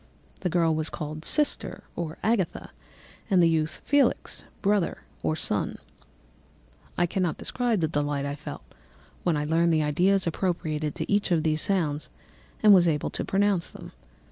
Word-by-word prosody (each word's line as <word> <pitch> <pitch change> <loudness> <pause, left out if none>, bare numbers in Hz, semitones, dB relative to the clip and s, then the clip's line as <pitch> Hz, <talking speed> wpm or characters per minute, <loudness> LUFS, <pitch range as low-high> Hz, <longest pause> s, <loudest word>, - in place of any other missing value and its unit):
_ - - -29
The 180 - -1
girl 165 -1 +2
was 155 0 -1
called 155 +1 -6
sister 300 - +1
or 165 -2 -4
Agatha, 215 -6 0 0.6
and 190 -3 +4
the 170 - +6
youth 160 -1 0
Felix, 285 -1 +1 0.2
brother, 200 -3 +1 0.2
or 80 -1 0
son. - - -2 1.2
I 175 - +3
cannot 175 -1 -1
describe 240 -6 0
the 160 - +2
delight 145 -2 -1
I 140 - -2
felt 150 +1 -8 0.6
when 170 -4 +1
I 150 - -1
learned 165 +2 +2
the 155 -1 +2
ideas 185 +6 +2
appropriated 155 -4 -2
to - - -4
each 205 0 +2
of 165 -3 +2
these 155 -1 +1
sounds 160 -7 0 0.5
and 210 -1 +9
was 175 -3 +6
able 150 -3 0
to - - -3
pronounce 195 -3 +1
them. - - -11
165 Hz, 165 wpm, -26 LUFS, 155-195 Hz, 1.2 s, and